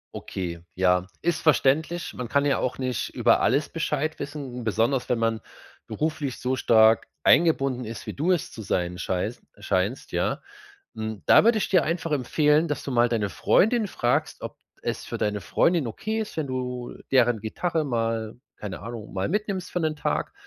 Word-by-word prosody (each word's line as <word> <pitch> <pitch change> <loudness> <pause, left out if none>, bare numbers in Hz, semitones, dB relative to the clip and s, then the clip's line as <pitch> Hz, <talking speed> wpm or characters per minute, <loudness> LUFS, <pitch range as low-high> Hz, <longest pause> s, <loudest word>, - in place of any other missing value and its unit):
Okay. 85 -3 -5
Ja, 90 0 +2
ist 170 -1 0
verständlich. 160 +3 +2
Man 125 -2 -6
kann 140 0 +2
ja 140 - +2
auch 125 - -2
nicht 130 -4 -2
über - - +3
alles 140 +3 +2
Bescheid 155 -1 -2
wissen. 140 -4 -6
Besonders 115 +4 0
wenn 125 - +1
man 115 -1 0 0.4
beruflich 150 -4 -3
so 130 +1 0
stark 110 -2 +4 0.2
eingebunden 135 -6 +3
ist, 115 +1 -7
wie - - -4
du 165 +6 0
es 175 - 0
zu 110 - -8
sein 90 -3 -1
scheis 95 +7 -2 0.2
scheinst, 100 +8 -1
ja. - - 0 0.5
Mm, 110 -1 -4
da - - +7
würde 230 0 +4
ich 215 - -1
dir 185 -3 +4
einfach 165 -1 -2
empfehlen, 150 +4 +2
dass 150 - -3
du 140 - -4
mal 120 0 +3
deine 110 -4 0
Freundin 215 - +2
fragst, 120 -8 -1
ob - - -7 0.2
es - - -3
für - - -5
deine 105 -1 -1
Freundin 165 - +2
okay 215 - -3
ist, 215 - -7
wenn 155 -3 -1
du 125 -1 -4 0.2
deren 120 -4 +3
Gitarre 160 +9 -1
mal 115 -3 -1 0.2
keine 100 -3 -6
Ahnung, 115 -2 -8
mal 95 0 -1
mitnimmst 200 -2 -2
für 180 - -1
'nen 155 -1 0
Tag. 150 - -2
130 Hz, 180 wpm, -25 LUFS, 110-155 Hz, 0.5 s, da